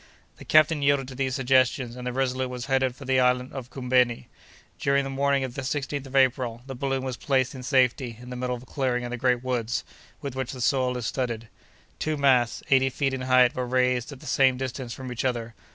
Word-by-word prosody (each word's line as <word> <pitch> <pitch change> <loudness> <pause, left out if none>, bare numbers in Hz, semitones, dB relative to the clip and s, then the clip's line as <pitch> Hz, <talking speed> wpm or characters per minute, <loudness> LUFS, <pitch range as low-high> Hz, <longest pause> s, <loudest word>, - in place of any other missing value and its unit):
The - - -12
captain 155 0 +4
yielded 140 -2 +2
to - - -8
these 130 0 -1
suggestions, 130 -2 +2
and 125 0 -6
the - - -1
Resolute 130 0 -1
was 125 0 -5
headed 130 -2 +1
for 135 - -11
the 130 0 +2
island 125 0 +2
of 130 -3 -7
Koumbeni. 125 -2 +1 0.5
During 140 0 +2
the 135 - -5
morning 140 0 +1
of 130 -2 -4
the 135 - -4
16th 140 0 -3
April, 125 -3 +2
the 135 - -6
balloon 135 0 -2
was 130 -2 -4
placed 130 -2 +1
in 130 - -8
safety 125 -2 +1
in 125 +1 -10
the - - -5
middle 125 0 -2
of 120 - -10
a - - -15
clearing 130 -3 -1
in 120 - -5
the - - -2
great 125 0 +1
woods, 120 -2 -1 0.4
with 140 -3 -6
which 130 -1 -3
the 130 - -8
soil 125 0 +1
is 120 - -4
studded. 115 -4 -3 0.5
Two 155 -1 -1
masts, 130 -4 +3
eighty 135 0 +5
feet 135 +1 -1
in 130 - -3
height, 130 -1 +4
were 125 -1 -3
raised 125 0 +1
at 135 - -11
the - - -12
same 130 -1 +3
distance 130 -1 -5
from 130 +1 -7
each 120 - -3
other. 120 -3 -2
130 Hz, 230 wpm, -26 LUFS, 125-135 Hz, 0.5 s, eighty